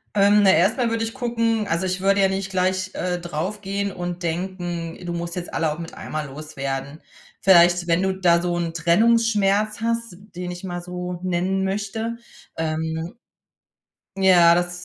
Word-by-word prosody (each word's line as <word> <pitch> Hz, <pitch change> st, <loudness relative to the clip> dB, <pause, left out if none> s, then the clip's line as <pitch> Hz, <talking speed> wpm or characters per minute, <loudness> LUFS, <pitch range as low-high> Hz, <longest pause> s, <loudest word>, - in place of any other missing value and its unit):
Ähm, 205 Hz, +1 st, +5 dB
na, 195 Hz, -, +6 dB
erstmal 220 Hz, -, +3 dB
würde 225 Hz, 0 st, -1 dB
ich 225 Hz, -, -6 dB
gucken 230 Hz, -4 st, 0 dB
also, 180 Hz, +1 st, 0 dB
ich 185 Hz, 0 st, -2 dB
würde 195 Hz, +1 st, +3 dB
ja 195 Hz, -, +5 dB
nicht 195 Hz, 0 st, -3 dB
gleich, 185 Hz, 0 st, 0 dB
äh, 180 Hz, -1 st, -1 dB
drauf 175 Hz, +5 st, -4 dB
gehen 200 Hz, 0 st, -2 dB
und 175 Hz, 0 st, -5 dB
denken: 175 Hz, -1 st, -3 dB
„Du 175 Hz, -, -3 dB
musst 170 Hz, 0 st, -4 dB
jetzt 175 Hz, -, -6 dB
alle 160 Hz, -2 st, 0 dB
auch 155 Hz, -, -6 dB
mit 165 Hz, 0 st, -7 dB
einmal 155 Hz, -2 st, -5 dB
loswerden.“ 140 Hz, 0 st, -5 dB, 0.4 s
Vielleicht, 175 Hz, -2 st, +5 dB
wenn 170 Hz, +1 st, +2 dB
du 190 Hz, 0 st, +1 dB
da 170 Hz, -2 st, +4 dB
so 175 Hz, 0 st, -1 dB
'n 170 Hz, -1 st, -2 dB
Trennungsschmerz 210 Hz, +3 st, +2 dB
hast, 230 Hz, -5 st, -2 dB, 0.2 s
den 180 Hz, 0 st, -4 dB
ich 175 Hz, +1 st, -8 dB
mal 175 Hz, -1 st, -4 dB
so 180 Hz, 0 st, -5 dB
nennen 185 Hz, +2 st, 0 dB
möchte, 210 Hz, +4 st, -3 dB, 0.4 s
ähm 160 Hz, +3 st, -3 dB, 1.0 s
ja, 175 Hz, -3 st, +6 dB
das 175 Hz, 0 st, -2 dB
180 Hz, 170 wpm, -23 LUFS, 170-200 Hz, 1.0 s, na